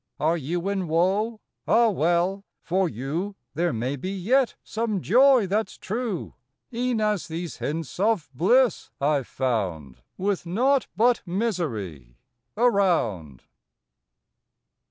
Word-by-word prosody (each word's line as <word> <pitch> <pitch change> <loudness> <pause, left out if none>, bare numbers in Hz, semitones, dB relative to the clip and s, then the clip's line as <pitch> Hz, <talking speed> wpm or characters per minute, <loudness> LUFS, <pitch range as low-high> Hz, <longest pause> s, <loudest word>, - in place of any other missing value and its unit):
Are 160 +3 +2
you 170 +4 -3
in 195 -3 -1
woe? 195 +7 +1 0.3
Ah, 235 0 +5
well 175 +3 +1 0.2
for 185 +1 +1
you 155 - -4 0.2
There 170 +3 0
may 125 +4 -2
be 145 +7 -5
yet 230 +7 +1
some 220 -3 -2
joy 250 +4 +5
that 210 +4 0
s - - -13
true, 220 -3 -4 0.4
E 245 +2 -1
en 235 -3 0
as 210 -3 0
these 170 +1 -5
hints 160 +2 -4
of 210 -4 +1
bliss 235 - +3
I 145 +1 +2
ve 135 - -8
found 90 - -3 0.2
With 195 0 -1
naught 255 +9 +2
but 240 +2 +3
misery 115 - -3 0.4
around. 170 - +1
180 Hz, 130 wpm, -25 LUFS, 145-220 Hz, 0.4 s, Ah